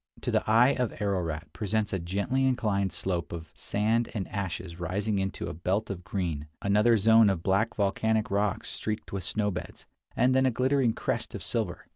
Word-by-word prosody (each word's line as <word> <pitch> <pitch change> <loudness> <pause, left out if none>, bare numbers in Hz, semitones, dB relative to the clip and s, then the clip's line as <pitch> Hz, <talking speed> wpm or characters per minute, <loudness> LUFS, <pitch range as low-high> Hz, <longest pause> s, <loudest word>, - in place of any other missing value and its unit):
To - - -2
the - - +2
eye 120 +5 +5 0.2
Ararat 90 -5 -2
presents 110 -1 -1
a 95 - 0
gently 100 +10 0
inclined 105 -7 +1
slope 85 -5 -2
of 80 -2 -7
sand 110 +3 0
and 100 -3 -2
ashes 95 -3 -4
rising 100 +4 -1
into 95 0 -3
a - - -4
belt 95 +7 -1
of 90 -2 -6
green, 85 -7 -3
another 105 +4 +4
zone 110 +1 +6
of 90 -4 -1
black 100 +5 +1
volcanic 110 +2 +1
rocks 100 -1 0
streaked 110 -1 -4
with 95 -2 -3
snow 105 +3 0
beds, 90 - -7 0.3
and 125 +2 +3
then 130 0 +4
a - - +4
glittering 130 0 +2
crest - - -3
of - - -6
silver. 105 -7 -2
100 Hz, 180 wpm, -28 LUFS, 95-110 Hz, 0.3 s, zone